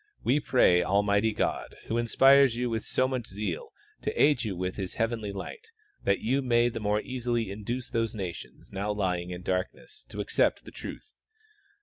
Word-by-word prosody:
We 135 Hz, +5 st, +3 dB
pray 105 Hz, -11 st, +4 dB
Almighty 100 Hz, +3 st, +2 dB
God, -, -, -2 dB
who 115 Hz, -, -1 dB
inspires 135 Hz, +2 st, +5 dB
you 120 Hz, 0 st, -1 dB
with 110 Hz, -1 st, -1 dB
so 130 Hz, -, +1 dB
much 130 Hz, -3 st, -3 dB
zeal, 95 Hz, -3 st, -4 dB, 0.3 s
to -, -, -1 dB
aid 145 Hz, -5 st, +4 dB
you 100 Hz, -5 st, -3 dB
with 90 Hz, +1 st, -2 dB
His 95 Hz, -3 st, -4 dB
heavenly 115 Hz, -2 st, -1 dB
light 440 Hz, -, -8 dB, 0.4 s
that 100 Hz, -, +2 dB
you 130 Hz, +5 st, +1 dB
may 120 Hz, -2 st, +3 dB
the 115 Hz, -, -5 dB
more 105 Hz, 0 st, +1 dB
easily 120 Hz, -4 st, -2 dB
induce 115 Hz, +5 st, -4 dB
those 115 Hz, -1 st, 0 dB
nations 90 Hz, -5 st, -7 dB
now 100 Hz, +2 st, -2 dB
lying 90 Hz, -4 st, -1 dB
in 90 Hz, 0 st, -6 dB
darkness 95 Hz, -, -3 dB
to -, -, -7 dB
ac -, -, -4 dB
cept -, -, +2 dB
the -, -, -10 dB
truth. 430 Hz, -, -8 dB
110 Hz, 185 wpm, -28 LUFS, 100-125 Hz, 0.4 s, inspires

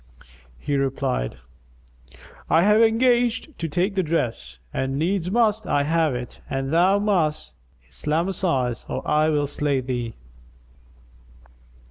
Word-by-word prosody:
He 140 Hz, -, -2 dB
replied, 135 Hz, -, -1 dB, 1.1 s
"I 165 Hz, -, +4 dB
have 210 Hz, +3 st, +5 dB
engaged 240 Hz, +4 st, +2 dB
to 165 Hz, -, -2 dB
take 180 Hz, +6 st, 0 dB
the 195 Hz, -, +1 dB
dress 120 Hz, -, -2 dB, 0.2 s
and 135 Hz, +1 st, -2 dB
needs 180 Hz, +3 st, 0 dB
must 220 Hz, 0 st, +1 dB
I 145 Hz, -, +2 dB
have 160 Hz, -2 st, +1 dB
it 125 Hz, 0 st, -7 dB
and 135 Hz, +2 st, -2 dB
thou 185 Hz, +4 st, +4 dB
must 185 Hz, -7 st, 0 dB, 0.3 s
Islamize 150 Hz, -, -1 dB
or -, -, -4 dB
I 155 Hz, +1 st, +3 dB
will 145 Hz, -2 st, +1 dB
slay 145 Hz, -1 st, 0 dB
thee." 120 Hz, -3 st, -4 dB
155 Hz, 120 wpm, -23 LUFS, 135-195 Hz, 1.1 s, have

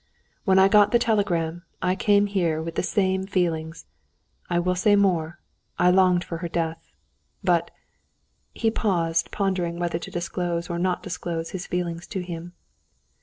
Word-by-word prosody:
When 190 Hz, -2 st, +4 dB
I 190 Hz, 0 st, +7 dB
got 205 Hz, 0 st, +5 dB
the 235 Hz, -, +5 dB
telegram, 175 Hz, -8 st, 0 dB, 0.2 s
I 180 Hz, -, +1 dB
came 205 Hz, +1 st, +3 dB
here 175 Hz, -6 st, 0 dB
with 165 Hz, +1 st, -4 dB
the -, -, 0 dB
same 190 Hz, 0 st, 0 dB
feelings; 165 Hz, -4 st, -1 dB, 0.6 s
I 175 Hz, -, +1 dB
will 180 Hz, +1 st, +1 dB
say 205 Hz, +3 st, +3 dB
more, 175 Hz, -5 st, +1 dB, 0.4 s
I 180 Hz, 0 st, +4 dB
longed 180 Hz, -1 st, +4 dB
for 165 Hz, -2 st, -6 dB
her 170 Hz, -, -3 dB
death. 165 Hz, -1 st, -3 dB, 0.5 s
But...." -, -, +2 dB, 0.8 s
He 225 Hz, -1 st, 0 dB
paused, 165 Hz, -7 st, 0 dB
pondering 185 Hz, -4 st, -1 dB
whether 175 Hz, -1 st, -1 dB
to -, -, -8 dB
disclose 175 Hz, 0 st, -3 dB
or 170 Hz, -, -2 dB
not 180 Hz, 0 st, 0 dB
to -, -, -8 dB
disclose 165 Hz, -1 st, -4 dB
his 185 Hz, -2 st, -5 dB
feeling 175 Hz, -2 st, -2 dB
to 190 Hz, +3 st, -6 dB
him. 175 Hz, 0 st, -7 dB
175 Hz, 165 wpm, -24 LUFS, 170-190 Hz, 0.8 s, I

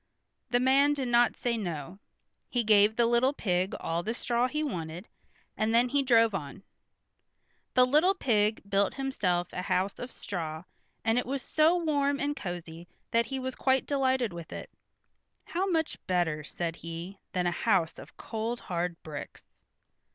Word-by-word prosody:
The 245 Hz, -, +3 dB
man 275 Hz, +3 st, +4 dB
did 265 Hz, -3 st, -2 dB
not 240 Hz, 0 st, +4 dB
say 235 Hz, -1 st, -1 dB
no. 175 Hz, -2 st, -5 dB, 0.5 s
He 245 Hz, -2 st, 0 dB
gave 210 Hz, 0 st, +5 dB
the 235 Hz, -, +3 dB
little 240 Hz, +4 st, +3 dB
pig 185 Hz, -7 st, 0 dB
all 165 Hz, +1 st, -1 dB
the 225 Hz, +6 st, -3 dB
straw 240 Hz, 0 st, +1 dB
he 300 Hz, +3 st, -2 dB
wanted, 175 Hz, -, -4 dB, 0.5 s
and 220 Hz, +1 st, +1 dB
then 245 Hz, +1 st, +4 dB
he 285 Hz, +2 st, +2 dB
drove 230 Hz, -4 st, +4 dB
on. 170 Hz, +1 st, -5 dB, 1.1 s
The 250 Hz, 0 st, +7 dB
little 310 Hz, +9 st, +4 dB
pig 215 Hz, -, +1 dB
built 200 Hz, 0 st, +1 dB
himself 185 Hz, -10 st, -1 dB
a 180 Hz, -, -3 dB
house 185 Hz, +2 st, 0 dB
of 245 Hz, 0 st, -6 dB
straw, 160 Hz, -4 st, -5 dB, 0.4 s
and 225 Hz, +2 st, +3 dB
it 250 Hz, -, -4 dB
was 270 Hz, 0 st, -2 dB
so 315 Hz, +3 st, +3 dB
warm 285 Hz, -4 st, +1 dB
and 290 Hz, +1 st, -1 dB
cosy 175 Hz, -, -6 dB, 0.2 s
that 230 Hz, 0 st, +2 dB
he 270 Hz, -, -3 dB
was 260 Hz, 0 st, -3 dB
quite 265 Hz, 0 st, +1 dB
delighted 260 Hz, -6 st, +1 dB
with 170 Hz, -2 st, -8 dB
it. -, -, -7 dB, 0.7 s
"How 370 Hz, +3 st, -2 dB
much 325 Hz, -4 st, 0 dB
better," 170 Hz, -4 st, 0 dB
said 165 Hz, +2 st, -4 dB
he 170 Hz, +4 st, -7 dB
"than 180 Hz, -1 st, 0 dB
a 175 Hz, -, +2 dB
house 180 Hz, -3 st, +1 dB
of -, -, -13 dB
cold 230 Hz, +2 st, -3 dB
hard 175 Hz, -1 st, -3 dB
bricks." 150 Hz, -3 st, -8 dB
225 Hz, 165 wpm, -29 LUFS, 175-260 Hz, 1.1 s, The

